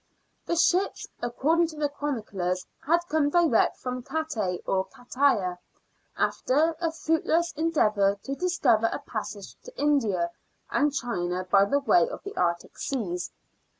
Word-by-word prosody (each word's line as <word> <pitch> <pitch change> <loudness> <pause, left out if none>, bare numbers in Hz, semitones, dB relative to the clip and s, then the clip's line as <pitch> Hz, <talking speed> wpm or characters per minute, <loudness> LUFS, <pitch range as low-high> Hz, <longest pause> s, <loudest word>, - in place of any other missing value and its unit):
The 340 - +1
ships, 365 +3 +2 0.2
according 310 +8 +2
to 315 - -10
the 300 -1 0
chroniclers, 210 -11 -3 0.2
had 340 +2 +4
come 305 -2 +2
direct 330 -7 +3
from 250 0 -4
Cattaie 235 - -2
or 190 0 +1
Cataya, 245 -8 0 0.6
after 315 +5 +1
a 330 -1 +1
fruitless 325 +1 +1
endeavour 215 -11 +2
to 275 - -3
discover 275 -10 +2
a - - -2
passage 210 -7 -6
to - - -13
India 215 -13 +1 0.4
and 295 0 +2
China 185 -9 -2
by 200 0 +6
way 285 - +3
of - - -8
the 400 - -7
Arctic 170 -1 -1
Seas. 180 -10 -2
270 Hz, 135 wpm, -27 LUFS, 200-320 Hz, 0.6 s, by